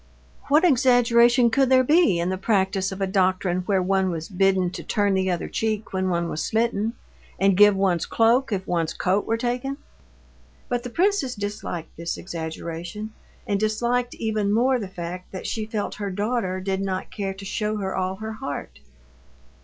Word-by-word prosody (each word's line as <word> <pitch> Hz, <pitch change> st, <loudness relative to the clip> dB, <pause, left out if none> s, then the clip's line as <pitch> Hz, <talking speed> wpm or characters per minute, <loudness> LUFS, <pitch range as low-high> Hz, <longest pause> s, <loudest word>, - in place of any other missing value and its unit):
What 300 Hz, +4 st, +4 dB
exaggeration 245 Hz, -3 st, +4 dB
could 270 Hz, +1 st, +3 dB
there 260 Hz, -1 st, +5 dB
be 295 Hz, -, +4 dB
in 170 Hz, +1 st, 0 dB
the 190 Hz, -, 0 dB
practice 190 Hz, -2 st, +1 dB
of 190 Hz, +1 st, -6 dB
a -, -, +2 dB
doctrine 185 Hz, -1 st, +1 dB
wherein 190 Hz, -3 st, +2 dB
one 190 Hz, -1 st, +2 dB
was 165 Hz, -2 st, -4 dB
bidden 190 Hz, -2 st, +2 dB
to -, -, -6 dB
turn 205 Hz, -1 st, +1 dB
the 190 Hz, 0 st, +1 dB
other 175 Hz, -2 st, -1 dB
cheek 215 Hz, -2 st, -2 dB
when 190 Hz, 0 st, 0 dB
one 170 Hz, -1 st, 0 dB
was 160 Hz, -, -3 dB
smitten, 225 Hz, -1 st, 0 dB, 0.5 s
and 195 Hz, 0 st, +4 dB
give 205 Hz, +1 st, +6 dB
one's 190 Hz, -3 st, +1 dB
cloak 235 Hz, +3 st, +3 dB
if 190 Hz, -2 st, -2 dB
one's 165 Hz, -3 st, -1 dB
coat 190 Hz, +3 st, 0 dB
were 225 Hz, -, +1 dB
taken? 250 Hz, +3 st, -2 dB, 0.9 s
But 245 Hz, -1 st, -1 dB
the 245 Hz, -, -6 dB
princess 345 Hz, -, +1 dB
disliked 205 Hz, -5 st, -5 dB
this 170 Hz, +1 st, -3 dB
exaggeration, 175 Hz, +4 st, -6 dB, 0.3 s
and 200 Hz, -1 st, 0 dB
disliked 240 Hz, +3 st, 0 dB
even 215 Hz, -2 st, -1 dB
more 250 Hz, +4 st, +3 dB
the 205 Hz, -, -4 dB
fact 180 Hz, 0 st, -7 dB
that 185 Hz, -, -6 dB
she 215 Hz, -1 st, -3 dB
felt 215 Hz, -2 st, -3 dB
her 205 Hz, -1 st, -4 dB
daughter 205 Hz, -1 st, -1 dB
did 190 Hz, 0 st, -2 dB
not 190 Hz, -1 st, -3 dB
care 195 Hz, -2 st, -4 dB
to 195 Hz, +1 st, -10 dB
show 215 Hz, +2 st, -2 dB
her 190 Hz, -2 st, -3 dB
all 185 Hz, 0 st, -1 dB
her 220 Hz, +2 st, -6 dB
heart. 145 Hz, -10 st, -6 dB
200 Hz, 180 wpm, -24 LUFS, 185-230 Hz, 0.9 s, give